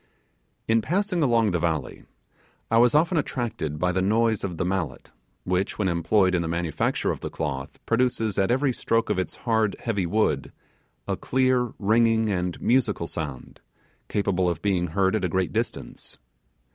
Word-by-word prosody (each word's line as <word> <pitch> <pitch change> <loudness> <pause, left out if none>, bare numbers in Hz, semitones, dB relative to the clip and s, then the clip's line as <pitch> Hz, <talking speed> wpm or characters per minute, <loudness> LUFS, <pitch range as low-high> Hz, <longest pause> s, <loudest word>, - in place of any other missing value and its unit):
In 115 0 +3
passing 180 - 0
along 115 -6 +3
the 85 - 0
valley, 80 -4 -2 0.7
I 115 - +5
was 120 +4 +4
often 165 +2 +3
attracted 115 - -3
by 90 +3 +1
the 95 +1 0
noise 110 +2 +2
of 90 -4 -4
the 90 - -1
mallet, 90 -8 -3 0.3
which, 90 +2 -1
when 105 - 0
employed 95 +2 +2
in 90 - +2
the 85 - -2
manufacture 85 -1 -1
of - - -5
the - - -5
cloth 70 -4 -4
produces 115 -4 +1
at 95 - +2
every 130 +2 +2
stroke 115 -2 0
of 100 - 0
its 95 - -3
hard, 110 -3 +2
heavy 100 -6 -1
wood, 85 -8 0 0.6
a - - 0
clear, 130 -2 +1
ringing, 110 +1 +3
and 90 -2 -2
musical 115 -8 +1
sound, 75 -6 -6 0.5
capable 95 -3 0
of 85 -2 -4
being 95 -3 +1
heard 95 +4 +1
at 110 - -1
a 90 - +1
great 95 +1 -1
distance. 115 +2 -4
100 Hz, 170 wpm, -25 LUFS, 90-115 Hz, 0.7 s, I